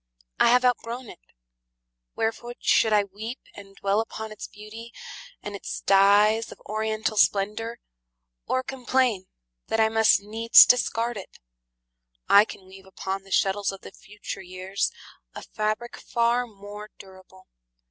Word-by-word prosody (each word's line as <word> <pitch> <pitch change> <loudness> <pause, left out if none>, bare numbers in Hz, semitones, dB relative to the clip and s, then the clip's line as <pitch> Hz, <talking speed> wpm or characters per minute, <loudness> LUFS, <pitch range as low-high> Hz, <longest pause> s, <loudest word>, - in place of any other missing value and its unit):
I - - +5
have 250 +1 +4
outgrown 245 0 -1
it. - - -15 1.0
Wherefore 230 +2 -3
should 220 - +3
I 210 -1 +4
weep 215 +5 -7 0.2
And 195 -1 -13
dwell 200 +2 0
upon 220 -1 -5
its 215 - -8
beauty, 220 +3 -11 0.5
and 205 - -6
its 200 - -6
dyes 205 +3 +4
Of - - -12
oriental 215 0 -2
splendor, 210 +4 +1 0.7
or 255 - 0
complain 255 -6 0 0.4
That 225 - -1
I 220 0 +4
must 225 0 +4
needs 220 +3 +6
discard 240 -1 +1
it? 195 - -10 0.9
I 205 +1 +7
can 190 - -11
weave 190 0 -15
Upon 190 0 -5
the 195 - -18
shuttles 195 +1 +1
of 195 - -11
the - - -11
future 210 -1 -9
years 185 +1 -3 0.4
A - - -8
fabric 215 +3 -3
far 235 +1 0
more 205 0 -11
durable. 190 -1 -16
215 Hz, 140 wpm, -25 LUFS, 195-230 Hz, 1.0 s, I